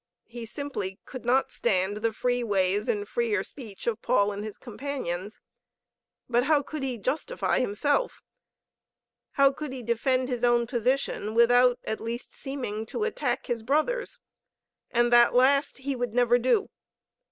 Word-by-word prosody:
He 230 -1 -8
simply 210 -8 -5
could 255 -3 -9
not 255 +3 +2
stand 195 -2 0
the 225 +1 0
free 245 +2 -1
ways 200 -1 +1
and 205 -1 -1
freer 220 -5 0
speech 220 -8 -8
of 235 -3 -1
Paul 205 0 +2
and 205 0 -5
his 215 -1 -6
companions. 220 -6 -5 0.9
But 245 +1 +2
how 295 -1 +3
could 305 +2 -6
he 260 -3 -2
justify 315 - -1
himself? 285 - 0 1.1
How 275 -1 +5
could 295 0 -6
he 260 -2 -6
defend 255 +3 +1
his 245 -2 -3
own 240 -1 +4
position 240 -3 -1
without 245 +1 +5
at 220 - -4
least 235 +2 -5
seeming 255 -6 -4
to 425 - -3
attack 440 - -1
his 240 -2 -2
brother's? 310 - 0 0.7
And 240 0 +2
that 240 0 +6
last 275 +3 +3
he 270 0 -3
would 245 -2 -3
never 245 0 +4
do. 255 - +1
240 Hz, 150 wpm, -27 LUFS, 220-270 Hz, 1.1 s, that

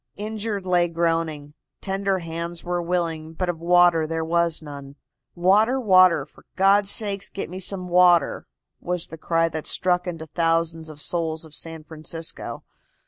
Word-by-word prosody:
Injured 210 -1 -4
lay 175 -1 +3
groaning. 165 -3 -2 0.3
Tender 195 0 -1
hands 170 0 -5
were 175 0 -2
willing, 165 -2 -2
but 180 +2 -2
of 165 -2 -3
water 175 -2 +4
there 160 0 -2
was 170 0 +1
none. 140 -2 -10 0.4
"Water, 210 +9 +3
water, 185 - +5
for 150 - -21
God's 195 +1 +4
sake 200 -2 +2
get 195 - -5
me 185 - -6
some 185 -1 -2
water," 175 -1 +3 0.3
was 180 -1 -3
the 165 - -9
cry 165 +1 +1
that 160 -1 -6
struck 180 0 +1
into 165 -2 -5
thousands 165 0 0
of 150 -1 -11
souls 160 0 -2
of 155 - -15
San 160 0 -3
Francisco. 160 +1 -5
170 Hz, 155 wpm, -23 LUFS, 160-185 Hz, 0.4 s, water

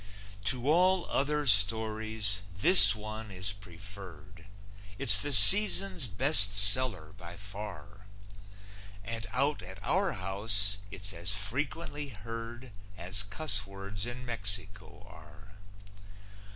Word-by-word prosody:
To 125 +4 -2
all 180 +3 -2
other 150 +1 -5
stories, 110 -1 +1 0.2
this 105 - +5
one 110 +1 -12
is 95 +1 -3
preferred; 95 -1 -15 0.5
It's 100 -2 +4
the 145 - -6
season's 100 -2 +7
best 100 - +1
seller 105 -1 0
by 85 -1 -16
far, 100 0 -14 1.0
And 115 0 -10
out 140 +3 -5
at 95 +1 -14
our 190 - -4
house 100 +1 0
it's 100 +1 -9
as 85 +3 -4
frequently 145 +7 -8
heard 115 +1 -14 0.3
As 95 +3 -4
cuss 100 -1 -4
words 100 +2 -11
in 125 +1 -12
Mexico 100 -3 -6
are. 100 +2 -21
105 Hz, 110 wpm, -25 LUFS, 95-115 Hz, 1.0 s, season's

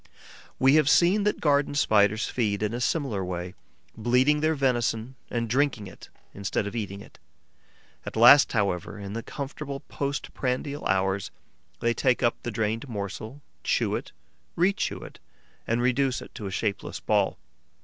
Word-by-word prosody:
We 135 +1 +5
have 150 -2 +4
seen 190 +6 +4
that 210 - +1
Garden 145 -1 +2
Spiders 110 -5 +3
feed 105 -4 -1
in 105 +1 -1
a 120 - -3
similar 125 - 0
way, 90 0 -4 0.4
bleeding 125 +6 +3
their 155 +1 +1
venison 120 -3 0 0.2
and 115 -1 -2
drinking 130 -3 +1
it 95 - -12 0.2
instead 100 0 -2
of 100 - -5
eating 100 -3 -4
it. - - -16 0.8
At - - -7
last, 120 +5 +7
however, 100 -2 -1
in 100 -1 -7
the 115 - -3
comfortable 140 +2 -6
post 140 0 -4
prandial 140 +3 -2
hours, 95 0 0 0.5
they 120 0 +2
take 125 0 +1
up 120 - +3
the - - -4
drained 110 +3 -2
morsel, 110 +6 -6 0.2
chew - - +1
it, - - -5 0.5
rechew 190 +4 0
it - - -13 0.5
and 115 +1 +1
reduce 130 +1 +1
it - - -12
to 105 - -6
a - - -5
shapeless 100 +1 -3
ball. - - +1
120 Hz, 160 wpm, -26 LUFS, 105-140 Hz, 0.8 s, last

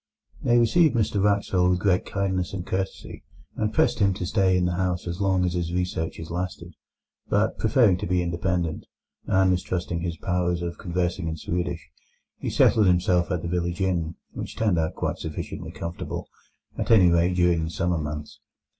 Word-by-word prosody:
They 120 - +3
received 130 +6 +4
Mr 105 -3 +1
Wraxall 100 -3 +2
with 90 - +3
great 90 -1 +1
kindness 95 -2 -1
and 90 -2 -4
courtesy, 95 +1 -4 0.3
and 105 -1 -1
pressed - - +2
him 100 -2 +3
to 90 - -4
stay 95 -1 +2
in 90 - +1
the 90 - +1
house 90 0 -1
as 85 +3 -4
long 95 -2 +2
as 90 - 0
his 85 -2 -2
researches 85 -2 -3
lasted. 85 0 -4 0.6
But, - - +1
preferring 110 -8 +4
to 100 - -4
be 90 0 +1
independent, 85 -1 -2 0.4
and 95 0 +3
mistrusting 90 -1 -2
his 85 -1 -3
powers 90 -1 -1
of 85 0 -5
conversing 90 -1 -2
in 80 0 -3
Swedish, 90 +3 -3 0.5
he - - -3
settled 105 -3 +4
himself 90 0 +2
at 90 -4 -2
the - - -2
village 85 0 -2
inn, 85 -4 0 0.2
which - - -7
turned 105 -7 +1
out 80 0 -1
quite - - -2
sufficiently 80 -1 -6
comfortable, 85 +1 -5 0.5
at - - -2
any 95 -6 +6
rate 85 +1 +2
during 90 -2 +3
the - - -4
summer 85 +2 -1
months. 75 0 -6
90 Hz, 180 wpm, -25 LUFS, 85-95 Hz, 0.6 s, any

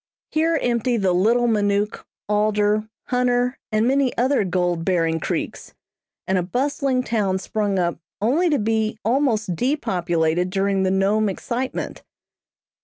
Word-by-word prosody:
Here 325 +1 +2
empty 240 0 0
the 190 -4 +1
Little 225 +7 +3
Minook, 205 -1 0 0.2
Alder, 210 +1 +1 0.2
Hunter, 250 0 +1
and 215 +2 +2
many 270 -1 +1
other 260 -1 +2
gold 175 -2 0
bearing 165 -3 +1
creeks, - - -4 0.5
and 190 0 +1
a - - +1
bustling 260 - 0
town 210 -5 0
sprung 205 0 -1
up 175 -3 0 0.2
only 290 - +2
to 295 - +2
be 220 0 0
almost 225 -6 +1
depopulated 175 - 0
during 195 0 0
the 190 - +2
Nome 200 +3 +2
excitement. 245 +6 -4
215 Hz, 130 wpm, -22 LUFS, 190-245 Hz, 0.5 s, Little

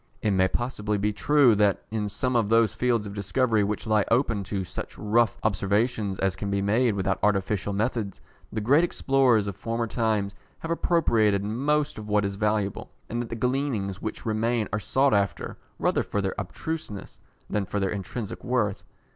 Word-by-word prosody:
It 105 - +2
may 95 -1 +3
possibly 105 -1 -2
be 105 +1 0
true 140 +2 +4
that, 105 -2 +2
in 105 -2 -1
some 125 +5 -1
of 115 -4 +2
those 115 -1 +4
fields 120 -4 +1
of 100 - -6
discovery 105 +2 +1
which 105 +2 -2
lie 110 -2 +3
open 115 -4 +2
to 95 -1 -2
such 90 - -7
rough 115 +2 +2
observations 100 0 0
as 95 -1 0
can 100 +1 -4
be 100 0 0
made 110 +3 +2
without 95 0 0
artificial 100 -1 +1
methods, 105 -1 -2 0.3
the 110 - -2
great 140 +10 +4
explorers 135 -9 +3
of 100 -2 -4
former 115 +3 -2
times 110 -4 0 0.2
have 165 - -5
appropriated 115 - +2
most 145 +6 0
of 105 - -8
what 105 -1 +2
is 100 0 -2
valuable, 105 -1 -1 0.2
and 120 +1 -2
that 120 - -6
the 115 - -4
gleanings 120 -6 -1
which 110 - -5
remain 110 0 0
are 105 - +1
sought 135 +5 +2
after, 100 -1 -1 0.2
rather - - +1
for 105 - -2
their 95 -1 -1
abstruseness, 105 - -6 0.3
than 105 0 -1
for 105 - -2
their 95 -1 0
intrinsic 105 +2 -5
worth. 120 -5 0
105 Hz, 180 wpm, -26 LUFS, 100-120 Hz, 0.3 s, true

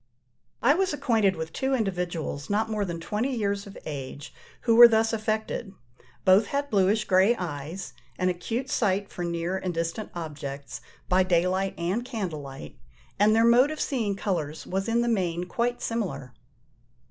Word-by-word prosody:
I 270 +5 +6
was 370 0 +1
acquainted 220 -9 +2
with 160 0 -5
two 265 0 0
individuals 180 - -3
not 220 +2 0
more 210 -1 0
than 170 -2 -4
twenty 220 +10 -2
years 200 -2 -1
of 200 - -11
age, 140 -1 -7 0.3
who 230 -2 +3
were 240 +1 +11
thus 225 0 +2
affected: 215 -1 -2 0.5
both 195 +3 +6
had 285 +3 -2
bluish 205 +1 +3
grey 190 +5 +4
eyes, 160 - -5 0.2
an 185 - +1
acute 225 +9 -3
sight 200 -5 0
for 175 - -5
near 170 +2 -2
and 180 -2 -3
distant 170 +6 -3
objects, 145 -4 -6 0.3
by 185 +1 +4
day 180 -2 +3
light 190 +1 -1
and 180 +8 -1
candle 200 - -4
light, 135 - -10 0.4
and 215 +2 +5
their 225 +1 +5
mode 245 +4 +6
of 310 -1 -5
seeing 225 -7 -1
colours 160 -7 -3
was 195 +3 -2
in 230 +1 +2
the 240 - 0
main 180 -6 0
quite 240 +6 -2
similar. 195 - -3
195 Hz, 170 wpm, -26 LUFS, 170-225 Hz, 0.5 s, were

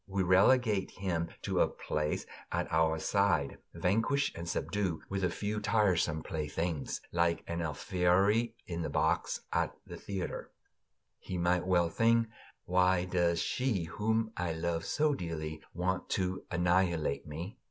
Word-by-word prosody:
We 95 -1 0
relegate 100 +3 +4
him 85 -3 -2
to - - 0
a - - +5
place 75 0 -2 0.3
at - - -1
our 80 0 +3
side, 85 -4 +1 0.2
vanquished 115 +9 +1
and 85 0 -5
subdued, 95 -5 -1
with 95 -1 -2
a 90 - +3
few 105 +4 -2
tiresome 90 -9 +2
playthings, 80 -2 -3
like 85 0 +1
an 85 0 -3
Alfieri 95 - +2
in 85 -1 -4
the - - -2
box - - +1
at - - 0
the - - -8
theater. 95 -3 -4 0.7
He 90 - -5
might 90 +1 +1
well 85 -2 +3
think: 115 +3 +3 0.4
Why 90 0 +3
does 85 -2 +1
she, 125 -9 0
whom 110 +6 0
I 90 -2 -1
love 80 0 -2
so 150 -1 +2
dearly, 80 - -4
want 90 +2 -2
to 95 -1 -2
annihilate 85 -5 +1
me? 85 +10 -6
90 Hz, 140 wpm, -32 LUFS, 85-100 Hz, 0.7 s, a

